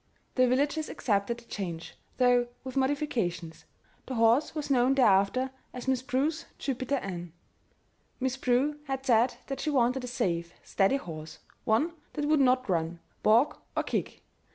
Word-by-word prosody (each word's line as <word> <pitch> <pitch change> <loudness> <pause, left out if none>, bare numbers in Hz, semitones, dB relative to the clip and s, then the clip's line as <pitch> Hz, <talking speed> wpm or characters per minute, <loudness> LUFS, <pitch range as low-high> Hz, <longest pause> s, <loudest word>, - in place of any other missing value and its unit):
The 255 -1 +4
villagers 290 +5 +1
accepted 210 +1 0
the 235 - -15
change 170 -7 -5 0.2
though 245 -1 +4 0.2
with 260 -1 -7
modifications; 250 - -1 0.4
the 260 - -4
horse 230 +7 +3
was 295 -2 -3
known 255 +1 +4
thereafter 245 +2 +3 0.2
as 250 +1 -7
"Miss 260 -2 +2
Prue's 285 +5 -1
Jupiter 265 0 -2
Ann." 175 - -5 0.9
Miss 260 -1 0
Prue 265 +3 +1
had 270 -1 -4
said 240 0 +3
that 275 -1 -5
she 305 - -1
wanted 255 -2 +2
a - - -4
safe, 170 -8 -2
steady 195 +7 +2
horse; 160 - -8 0.3
one 265 +11 +2 0.2
that 295 - -2
would 305 0 +3
not 255 -1 +3
run, 170 -2 -1 0.2
balk, 235 +8 +3 0.2
or - - +2
kick. - - -3
250 Hz, 155 wpm, -29 LUFS, 205-270 Hz, 0.9 s, The